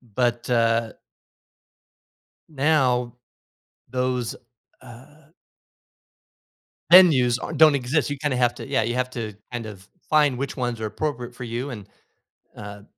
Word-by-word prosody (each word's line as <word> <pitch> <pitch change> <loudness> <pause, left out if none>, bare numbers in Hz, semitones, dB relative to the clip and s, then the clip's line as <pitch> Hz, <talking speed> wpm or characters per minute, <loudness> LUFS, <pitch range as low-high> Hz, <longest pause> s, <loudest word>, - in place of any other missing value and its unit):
but, 120 -1 0
uh 115 -1 +1 1.6
now, 135 -5 +1 0.8
those, 125 -2 -2 0.5
uh 135 +5 -16 1.7
venues 135 -10 +7
are - - -5
don't 155 -1 +6
exist, 135 +1 0
you 145 - -3
kinda 140 -2 -2
have 120 -1 +2
to - - -9
Yeah, 135 -4 0
you 115 +2 -2
have 125 0 -1
to 115 -4 -6 0.2
kind 120 -2 -5
of 105 -3 -10
f 95 - -21 0.2
find 150 -4 +3
which 140 +1 -4
ones 120 -3 -3
are 110 - -2
appropriate 125 0 -4
for 125 - -8
you 120 +3 -4
and, 105 -6 -8 0.7
uh 105 -1 -9
125 Hz, 135 wpm, -23 LUFS, 115-140 Hz, 1.7 s, venues